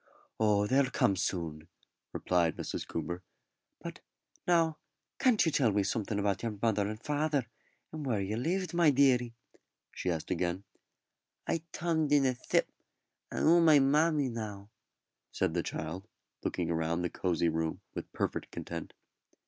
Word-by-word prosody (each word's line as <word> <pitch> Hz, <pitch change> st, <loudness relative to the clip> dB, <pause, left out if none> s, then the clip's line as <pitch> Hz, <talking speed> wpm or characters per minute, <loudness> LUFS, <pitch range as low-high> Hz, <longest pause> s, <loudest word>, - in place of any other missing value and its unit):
"Oh, 105 Hz, -2 st, +3 dB
they'll 130 Hz, +4 st, +3 dB
come 100 Hz, -, +2 dB
soon," 85 Hz, -5 st, -3 dB, 0.4 s
replied 85 Hz, -3 st, +1 dB
Mrs. -, -, -4 dB
Coomber. 85 Hz, +2 st, -4 dB, 0.6 s
"But, -, -, -7 dB, 0.5 s
now, 165 Hz, -3 st, +3 dB, 0.4 s
can't 245 Hz, -8 st, +4 dB
you 160 Hz, -, +2 dB
tell 130 Hz, -6 st, +3 dB
me 100 Hz, 0 st, +2 dB
something 105 Hz, +1 st, -1 dB
about 100 Hz, -2 st, 0 dB
your 115 Hz, -3 st, -3 dB
mother 105 Hz, -2 st, +1 dB
and 110 Hz, +1 st, -5 dB
father, 150 Hz, -1 st, 0 dB, 0.5 s
and 155 Hz, -1 st, -5 dB
where 120 Hz, -7 st, 0 dB
you 100 Hz, +2 st, -2 dB
lived, 175 Hz, +8 st, -1 dB
my 170 Hz, -2 st, +5 dB
deary?" 125 Hz, -4 st, +3 dB, 0.6 s
she 90 Hz, -, -3 dB
asked 80 Hz, -3 st, -2 dB
again. 90 Hz, +1 st, -1 dB, 0.8 s
"I 165 Hz, -, 0 dB
tomed 160 Hz, -3 st, 0 dB
in 145 Hz, -2 st, +5 dB
a 130 Hz, -, +3 dB
s'ip, 125 Hz, -, +1 dB, 0.6 s
and -, -, -1 dB
'ou 170 Hz, +2 st, +6 dB
my 160 Hz, -3 st, +7 dB
mammy 145 Hz, +1 st, +3 dB
now," 105 Hz, -3 st, -6 dB, 0.6 s
said 80 Hz, -, 0 dB
the 85 Hz, -, +1 dB
child, 85 Hz, +6 st, -5 dB, 0.4 s
looking 85 Hz, -1 st, -1 dB
round 80 Hz, +2 st, 0 dB
the 90 Hz, -, 0 dB
cosy 85 Hz, -2 st, +1 dB
room 80 Hz, 0 st, -2 dB
with -, -, -6 dB
perfect -, -, -2 dB
content. 85 Hz, -1 st, -6 dB
110 Hz, 150 wpm, -31 LUFS, 90-145 Hz, 0.8 s, my